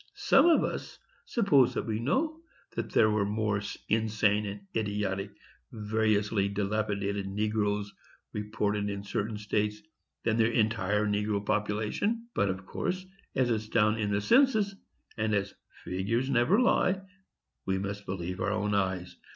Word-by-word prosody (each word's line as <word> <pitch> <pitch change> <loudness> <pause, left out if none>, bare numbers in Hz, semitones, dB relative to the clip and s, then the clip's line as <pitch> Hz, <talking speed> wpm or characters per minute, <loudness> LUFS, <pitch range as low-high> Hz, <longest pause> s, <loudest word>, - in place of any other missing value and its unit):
Some - - +5
of 335 - +5
us - - -4 0.3
suppose 145 - +3
that - - -1
we 110 -1 -2
know 310 - 0 0.3
that - - -4
there 110 - +4
were 105 -1 +2
more 105 0 0 0.3
insane 105 -1 +2
and 100 0 -6
idiotic 100 -2 -1 0.4
and 110 -2 -8
variously 105 -2 +2
dilapidated 100 -1 -1
negroes 105 0 -1 0.4
reported 105 -1 -1
in 100 0 -4
certain 105 +2 -2
states 105 0 -1 0.4
than 110 -1 +1
their 115 0 +4
entire 105 -2 +1
negro 105 0 0
population. 110 - -1
But, 100 - +1
of 95 0 -4
course, 185 - -3 0.3
as 130 -2 +2
it's 110 -1 -1
down 110 0 +3
in 105 -1 0
the 100 0 +1
census, 220 - +4 0.4
and 110 -1 +1
as 100 0 -1 0.3
"figures 115 +9 -1
never 140 - +4
lie," 195 -6 +3 0.7
we 95 0 +1
must 100 +1 -5
believe 90 -1 -4
our - - +1
own 105 -1 0
eyes. 95 -3 -1
105 Hz, 145 wpm, -29 LUFS, 100-115 Hz, 0.7 s, Some